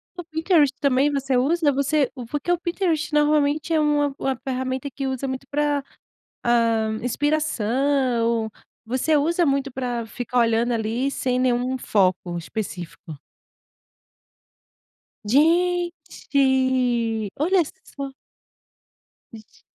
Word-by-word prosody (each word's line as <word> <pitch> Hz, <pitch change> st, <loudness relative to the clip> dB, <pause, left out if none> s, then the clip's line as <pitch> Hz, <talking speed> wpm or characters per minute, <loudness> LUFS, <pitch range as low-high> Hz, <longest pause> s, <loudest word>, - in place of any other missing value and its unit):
O 355 Hz, -, -6 dB
Pinterest, 320 Hz, -2 st, +2 dB
também 280 Hz, +1 st, +2 dB
você 270 Hz, -2 st, -1 dB
usa, 300 Hz, +3 st, +2 dB
você 280 Hz, 0 st, +1 dB, 0.2 s
porque 295 Hz, +5 st, -2 dB
o 350 Hz, -, +3 dB
Pinterest 345 Hz, -3 st, -1 dB
normalmente 295 Hz, +1 st, +2 dB
é 315 Hz, -, +3 dB
uma 295 Hz, -2 st, +2 dB
uma 270 Hz, -1 st, 0 dB
ferramenta 260 Hz, +1 st, -2 dB
que 270 Hz, +1 st, -4 dB
usa 265 Hz, +1 st, -3 dB
muito 260 Hz, +1 st, -5 dB
pra, 290 Hz, -1 st, 0 dB, 0.6 s
hã, 230 Hz, -2 st, +2 dB
inspiração, 250 Hz, -4 st, 0 dB, 0.3 s
você 260 Hz, +6 st, +1 dB
usa 335 Hz, +4 st, +2 dB
muito 275 Hz, -1 st, 0 dB
pra 245 Hz, -2 st, -3 dB
ficar 245 Hz, +1 st, -3 dB
olhando 230 Hz, +1 st, +2 dB
ali 230 Hz, +3 st, -1 dB
sem 255 Hz, -2 st, -1 dB
nenhum 255 Hz, +1 st, +1 dB
foco 185 Hz, -5 st, +1 dB
específico? 175 Hz, -4 st, -6 dB, 2.1 s
Gente, 345 Hz, +8 st, +3 dB, 1.5 s
olha 355 Hz, +3 st, +3 dB, 0.2 s
só! 275 Hz, -1 st, -7 dB, 1.2 s
Ge 220 Hz, -2 st, -15 dB
270 Hz, 105 wpm, -23 LUFS, 240-300 Hz, 2.1 s, o